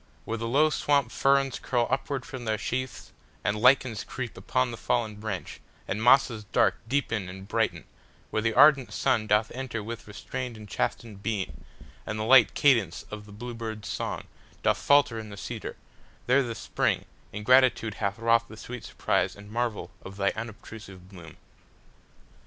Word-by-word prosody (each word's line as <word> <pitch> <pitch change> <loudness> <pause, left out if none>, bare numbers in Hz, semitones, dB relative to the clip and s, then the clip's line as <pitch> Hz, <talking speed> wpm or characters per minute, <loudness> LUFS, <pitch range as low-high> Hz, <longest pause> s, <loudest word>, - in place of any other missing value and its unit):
Where 115 0 -3
the 115 - -3
low 150 +6 +4
swamp 140 -5 +2
fernsCurl 135 -2 +1
upward 135 0 -1
from 130 -5 -7
their 110 -1 0
sheaths, 130 +4 -4 0.3
and 100 - +1
lichens 125 -1 +3
creepUpon 65 - -2
the - - -6
fallen 110 -3 -1
branch, 105 -3 -5 0.3
and 105 +3 -2
mosses 120 -2 +4
darkDeepen 110 -3 0
and 95 +1 -9
brighten, - - 0 0.5
where 110 - 0
the 115 0 0
ardent 135 -5 +6
sunDoth 110 -4 +2
enter 125 -4 -4
with 115 +1 -7
restrained 120 +3 -6
and 105 -1 -10
chastened 105 0 -3
beam, 95 - -3 0.4
And 110 - -4
the 110 - -2
light 120 0 +6
cadence 115 - +3
of 105 0 -7
the - - -13
blue 120 +4 -7
bird's 110 -2 -6
songDoth - - -3
falter 140 -5 +3
in 110 -1 -8
the 100 - -9
cedar,—there 125 +5 -3
the 120 -3 -3
SpringIn 95 - -1 0.4
gratitude 125 -2 +4
hath 100 -1 -2
wrought 115 0 +2
the 110 - -11
sweet 120 0 -8
surpriseAnd 105 0 0
marvel 115 -1 -2
of 95 +1 -10
thy 100 0 +2
unobtrusive 105 -4 -9
bloom. 85 -5 -12
115 Hz, 150 wpm, -27 LUFS, 105-125 Hz, 0.5 s, ardent